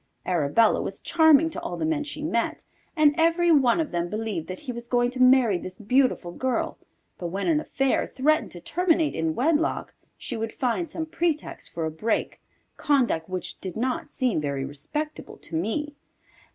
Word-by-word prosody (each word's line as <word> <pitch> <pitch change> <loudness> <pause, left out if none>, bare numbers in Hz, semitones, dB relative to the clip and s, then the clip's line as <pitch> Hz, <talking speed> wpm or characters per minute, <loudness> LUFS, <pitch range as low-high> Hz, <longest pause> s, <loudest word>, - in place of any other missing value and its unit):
Arabella 175 +5 +3
was - - -4
charming 320 -2 +5
to 335 - -5
all 335 - -4
the 315 - -1
men 315 -2 0
she 295 0 -5
met, 235 -7 -1 0.3
and 305 -2 +5
every 335 +1 +3
one 270 -3 +4
of 320 - -1
them 175 0 -1
believed 215 -5 -3
that 185 - -5
he 280 -4 -5
was 235 0 -7
going 245 0 +2
to 255 0 -3
marry 255 -7 +5
this 185 +2 -8
beautiful 240 -5 +1
girl, 255 +6 -2 0.4
but 175 - -3
when 195 +4 -3
an 320 -3 +3
affair 270 -3 0
threatened 310 +4 +1
to 175 - -10
terminate 330 - +1
in 160 -1 -1
wedlock, 315 +4 0 0.2
she - - -5
would 225 0 -3
find 260 +7 -1
some 320 +1 -4
pretext 325 -1 -2
for 165 -1 -3
a 160 - -2
break, 215 +9 -2 0.4
conduct 245 - +1
which 185 -2 -4
did 190 +1 -5
not 250 +2 -2
seem 250 - 0
very 140 -2 -2
respectable 295 - -5
to 165 - -7
me. 225 - -1
255 Hz, 180 wpm, -25 LUFS, 185-305 Hz, 0.4 s, charming